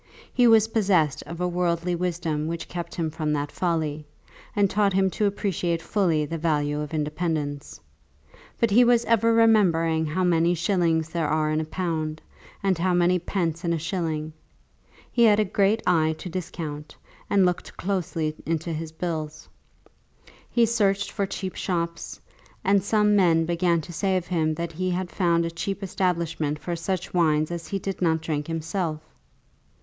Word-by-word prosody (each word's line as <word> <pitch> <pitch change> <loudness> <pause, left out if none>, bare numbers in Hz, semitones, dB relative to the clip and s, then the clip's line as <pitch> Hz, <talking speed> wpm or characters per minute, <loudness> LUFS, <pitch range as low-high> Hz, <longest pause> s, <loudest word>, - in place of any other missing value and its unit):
He 245 -1 +5
was 225 -1 +5
possessed 190 - +2
of 170 0 -7
a 180 - 0
worldly 175 0 0
wisdom 170 -3 -2
which 170 +1 -4
kept 170 -1 -6
him 165 -3 -2
from 155 -1 -2
that 145 0 -2
folly, 155 -4 -2 0.5
and 205 -1 +4
taught 200 0 +1
him 190 0 +2
to 210 - +1
appreciate 180 -4 -1
fully 165 -5 +1
the 165 +2 -4
value 150 -2 0
of 150 -1 -4
independence. 150 -2 -3 0.8
But 230 -3 +2
he 240 +5 +6
was 240 -1 +4
ever 230 0 +3
remembering 170 -8 +3
how 175 +5 -1
many 170 0 +3
shillings 165 -2 +1
there 165 -2 -1
are 155 0 +1
in 155 +1 +1
a - - -4
pound, 155 -2 -3 0.4
and 190 -3 +1
how 180 +1 +2
many 175 +1 +3
pence 170 -1 -2
in 170 -1 +1
a - - 0
shilling. 160 -2 -3 0.8
He 235 -1 +4
had 210 -1 +5
a 215 - +3
great 205 +3 +1
eye 160 -2 +3
to 180 - -7
discount, 160 -4 -6 0.3
and 195 -2 +4
looked 180 -1 -1
very - - -13
closely 165 -5 -2
into 165 +1 -2
his 160 0 -5
bills. 160 -2 -4 1.0
He 235 -1 +3
searched 200 -3 +1
for 200 -2 -1
cheap 190 -1 -5
shops; 170 -2 -3 0.4
and 195 -1 +3
some 210 0 +3
men 165 -4 +4
began 170 0 +1
to 175 +3 -10
say 190 +2 +1
of 180 - -3
him 160 -3 0
that 170 +1 -4
he 185 +3 -2
had 180 0 -2
found 170 -3 +2
a 165 - -3
cheap 195 +4 -4
establishment 170 -5 -1
for 170 +3 -4
such 180 +2 -3
wines 155 -3 +2
as 170 -2 -5
he 200 - -2
did 195 0 -5
not 160 -2 +2
drink 150 -2 -3
himself! 165 0 -2
170 Hz, 175 wpm, -25 LUFS, 160-190 Hz, 1.0 s, he